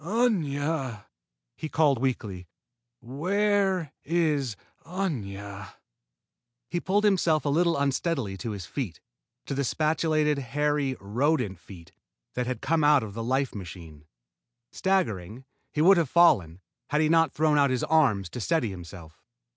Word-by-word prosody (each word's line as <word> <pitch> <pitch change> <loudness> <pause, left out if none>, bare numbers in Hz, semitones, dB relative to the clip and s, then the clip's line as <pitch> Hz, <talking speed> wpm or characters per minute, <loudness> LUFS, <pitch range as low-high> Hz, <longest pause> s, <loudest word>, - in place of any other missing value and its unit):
"Aña!" 155 - -1 0.5
he 155 - -6
called 150 -6 +3
weakly. 105 -8 -3 0.5
"Where 185 - 0
is 150 -7 0 0.3
Aña?" 100 - -5 1.0
He 175 - 0
pulled 200 +4 +1
himself 170 -7 +2
a - - +1
little 170 +2 +2
unsteadily 140 - -1
to 115 - -5
his 100 -4 -5
feet 95 - -5 0.5
to - - -4
the 140 - -1
spatulated, 155 +1 +1
hairy 140 0 -1
rodent 110 - 0
feet 85 -3 -13 0.4
that 125 -1 -2
had 130 - -3
come 160 +1 +1
out 145 -3 +5
of 105 -2 -7
the 115 +2 -4
life 130 +2 0
machine. 85 -6 -10 0.6
Staggering, 125 - -1 0.3
he 150 - +1
would 190 +2 +7
have 165 -6 +1
fallen, 95 - +4 0.3
had 150 - +1
he 155 - +3
not 165 0 +3
thrown 150 -1 +2
out 140 -1 +4
his 130 -1 -1
arm 140 -11 +3
to 105 +7 -7
steady 150 -3 0
himself. 85 -3 -11
140 Hz, 140 wpm, -27 LUFS, 105-160 Hz, 1.0 s, would